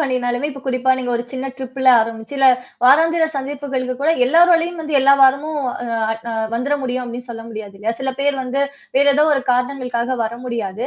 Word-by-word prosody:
பண்ணினாலுமே 255 -1 -1
இப்ப 275 -1 -9
குறிப்பா 255 0 0
நீங்க 250 -1 -3
ஒரு 235 - -3
சின்ன 260 0 -4
ட்ரிப்ல 260 0 -2
ஆரம்பிச்சு 225 +3 -5
இல்ல, 270 -1 +4 0.4
வாராந்திர 325 +5 +5
சந்திப்புகளுக்கு 270 -2 -3
கூட 315 - +3 0.2
எல்லாரலயும் 340 +3 +3
வந்து 305 -2 -1
எல்லா 275 +1 +6
வாரமும் 280 +3 +3 0.3
அ 225 -1 -1 0.2
அ - - -3 0.2
வந்துர 275 +5 0
முடியும் 250 0 -2
அப்டின்னு 245 +1 -8
சொல்ல 225 -1 -8
முடியாது 215 -3 -8
இல்லையா? 220 +3 -2
சில 265 0 -2
பேர் 285 0 +1
வந்து 270 +2 -1 0.3
வேற 280 +1 +4
ஏதோ 300 +1 +4
ஒரு 270 - -1
காரணங்களுக்காக 250 -1 -2
வர 220 +1 -4
முடியாது. 230 -1 -4
260 Hz, 180 wpm, -19 LUFS, 240-280 Hz, 0.4 s, எல்லா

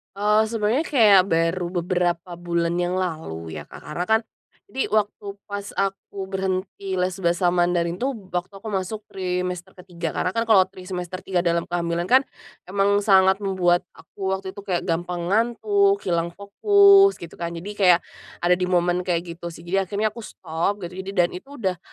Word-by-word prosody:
Eee, 210 +2 +3
sebenarnya 225 +7 0
kayak 215 - +6
baru 165 +1 +1 0.2
beberapa 175 -1 -1
bulan 170 -1 -1
yang 180 +1 0
lalu 155 - -4
ya - - -8
Kak, - - -12
karena 175 +4 -4
kan 220 +1 +4 0.5
jadi 265 - -3
waktu 205 -1 -1
pas 200 0 -5
aku 195 0 -3
berhenti 190 0 -3
les 180 0 0
bahasa 175 +1 +2
Mandarin 175 -1 +1
tuh, 260 +7 -1 0.2
waktu 175 +3 -2
aku 200 +3 -10
masuk 200 +1 -2
trimester 180 0 -3
ke-3 175 -3 -6
karena 185 +4 -2
kan 230 - +2
kalau 200 -5 +5
tri 185 -1 -13
semester 180 0 -5
3 185 -2 0
dalam 170 -1 +1
kehamilan 170 0 -2
kan, 255 +8 +5 0.5
emang 200 +1 +2
sangat 190 -1 +4
membuat 180 -3 +1
aku 190 +4 -7
waktu 190 0 -6
itu 200 - -11
kayak 190 -3 -2
gampang 175 +1 -2
ngantuk, 395 - +2
hilang 170 -1 -1
fokus, 395 - +5
gitu 170 -2 -11
kan, 170 0 -4
jadi 180 +5 -6
kayak, 180 -3 +6 0.4
ada 175 +1 +5
di 180 - 0
momen 180 0 +1
kayak 170 -1 +1 0.2
gitu 170 - -6
sih. 165 0 -9
Jadi 190 +2 0
akhirnya 210 +2 0
aku 235 - -11
stop, 185 0 -3
dan 175 - -5
ini, 190 +2 -7
dan 175 -2 +3
itu, 185 +9 -9
udah 190 -8 -2
185 Hz, 180 wpm, -23 LUFS, 175-200 Hz, 0.5 s, kayak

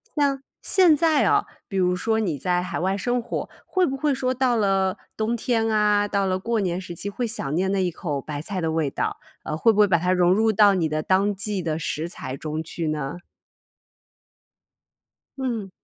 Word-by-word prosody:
像 280 -3 +1 0.2
现 360 -5 +5
在 315 -1 +3
啊， - - +3 0.2
比 195 - -3
如 180 -1 +2
说 220 +4 0
你 180 -9 -1
在 180 +4 0
海 180 - -4
外 190 +3 0
生 245 +5 0
活， 235 - -4 0.2
会 370 -1 +1
不 270 - -2
会 290 +1 +1
说 255 -1 0
到 255 -1 +1
了 195 -3 +1 0.2
冬 220 +2 0
天 230 -1 0
啊， 210 -1 +3
到 200 -1 0
了 185 -1 0
过 230 +3 -1
年 180 -3 -1
时 180 -2 -7
期 200 - -4
会 240 +4 -3
想 180 -11 -3
念 190 +3 +1
那 195 -1 +1
一 180 - 0
口 150 -4 -4
白 145 0 -5
菜 190 +4 -4
的 165 -2 -1
味 160 -3 0
道？ - - -2 0.3
呃， - - -3
会 225 +9 +4
不 210 - -1
会 210 - +7
把 180 -3 +3
它 180 +2 0
融 180 -1 +4
入 220 +3 +3
到 205 -1 +5
你 170 -4 0
的 155 0 -1
当 195 +5 +2
季 195 0 -3
的 160 -2 -2
食 155 +2 -3
材 130 - -6
中 155 +2 -4
去 165 0 -4
呢？ 150 -1 -3 2.2
嗯。 235 -7 -3
195 Hz, 225 characters per minute, -24 LUFS, 170-225 Hz, 2.2 s, 会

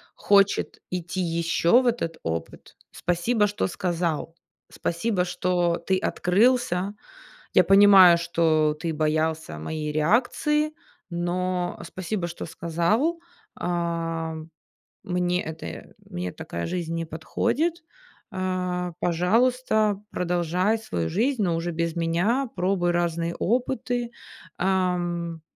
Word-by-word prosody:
хочет 200 0 +2
идти 180 0 -3
ещё 170 +5 +3
в 255 - -1
этот 165 -9 -1
опыт. 80 0 -5 0.2
Спасибо, 205 +5 +1
что 205 - -1
сказал. 170 -3 -2 0.3
Спасибо, 180 +2 -1
что 175 -1 0
ты 190 - +3
открылся. 195 -1 +2 0.6
Я - - +6
понимаю, 195 -3 +8
что 160 -3 +2
ты 165 -1 -2
боялся 155 - -1
моей 150 - -4
реакции, 255 - +1 0.4
но, 175 +1 -1
э, - - -7
спасибо, 185 0 -4
что 170 0 -6
сказал. 170 - 0 0.3
Ам, 165 -2 -3 0.5
мне 180 -1 0
это 160 0 -8 0.2
мне 90 +1 -4
такая 85 - -6
жизнь 170 -2 -3
не 165 0 -2
подходит. 235 - -1 0.5
Э, 180 -1 -2
пожалуйста, 215 +3 +2
продолжай 180 +4 0
свою 85 - -3
жизнь, 235 +3 +1
но 175 -3 +1
уже 170 +1 -2
без 170 0 -2
меня, 180 +11 +1
пробуй 180 -1 +1
разные 170 -1 -1
опыты. 245 +1 -1 0.5
Ам, 175 -3 -1
175 Hz, 110 wpm, -25 LUFS, 165-200 Hz, 0.6 s, понимаю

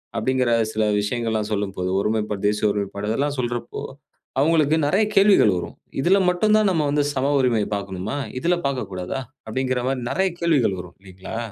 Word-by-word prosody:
அப்படிங்கிற 125 +2 +1 0.2
சில 110 - +1 0.2
விஷயங்கள்லாம் 110 0 -2
சொல்லும்போது, 95 -3 -2
ஒருமைப்பாடு, 105 -1 -1
தேசிய 105 0 +1
ஒருமைப்பாடு 100 0 -3
அதெல்லாம் 140 +5 -1
சொல்றப்போ, 120 -1 -3 0.6
அவுங்களுக்கு 155 0 +3
நெறையா 200 +7 +3
கேள்விகள் 195 - +5
வரும். 90 - -6 0.3
இதில 190 +7 +4
மட்டும் 210 +4 +2
தான் 215 -2 +3
நம்ம 160 -4 +1
வந்து 145 0 +2
சம 135 +2 +1
உரிமை 120 -5 +2
பாக்கணுமா? 100 +4 -4 0.2
இதில 175 +4 +1
பாக்கக்கூடாதா? 100 -4 -4 0.3
அப்டிங்கிற 130 +2 -1
மாரி 135 -1 -1
நெறையா 190 -1 +1
கேள்விகள் 140 - +2
வரும், 90 -1 -14
இல்லைங்களா? 95 +3 -8
120 Hz, 150 wpm, -22 LUFS, 105-145 Hz, 0.6 s, கேள்விகள்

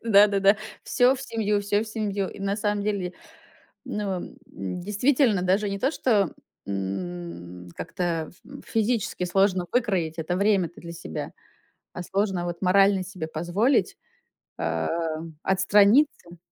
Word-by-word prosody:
Да-да-да, 200 -2 +5 0.3
всё 250 +1 +3
в 270 - -7
семью, 210 -4 0
всё 205 +1 +1
в - - -7
семью. 205 -3 -2
И - - -10
на 200 +1 -1
самом 210 -1 0
деле, 200 -4 -2 0.7
ну, 210 - -3
м, 180 - -6 0.5
действительно, 215 +2 +2
даже 195 +3 +1
не 200 0 -3
то, 265 - +1
что, 210 - +1 0.3
м, 90 -2 -5
как-то 170 -4 -2
ф - - -22
м 275 +1 -11
физически 225 -4 0
сложно 185 0 +2
выкроить 190 -10 0
это 165 +2 -2
время-то 190 -3 +1
для 170 - -8
себя, 170 - -6 0.6
а 180 - -5
сложно 190 -1 -1
вот 175 -1 -4
морально 195 +1 +4
себе 180 -4 -6
позволить, 175 - +1 0.6
а, - - -1 0.6
отстраниться. 200 - +3
195 Hz, 135 wpm, -25 LUFS, 175-210 Hz, 0.7 s, Да-да-да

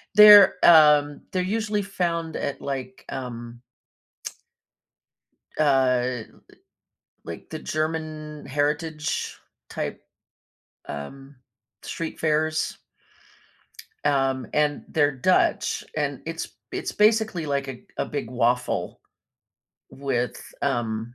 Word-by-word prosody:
they're, 210 -2 +10
um, 150 -3 +6
they're 185 -1 +1
usually 210 +1 -1
found 170 -4 -2
at, 140 - -4
like, 140 +6 -5
um 120 -3 -7 2.0
Uh, 130 -4 +2 1.0
like 85 - -9
the 155 - -6
German 155 -1 -4
heritage 150 +3 -2 0.3
type, - - -4 0.9
um, 135 - -8 0.5
street 165 -1 -5
fairs. 155 0 0 1.3
Um, 135 -3 +1
and 150 -1 +1
they're 145 -2 +2
Dutch, 180 +8 +1
and - - -2
it's - - -4 0.2
it's - - -3
basically, 215 -5 +2
like, 140 -1 -1
a 130 -2 -7 0.2
a - - +1
big 140 -5 -5
waffle 125 0 0 0.9
with, 130 -4 -2 0.2
um, 115 0 -2
145 Hz, 90 wpm, -24 LUFS, 130-160 Hz, 2.0 s, they're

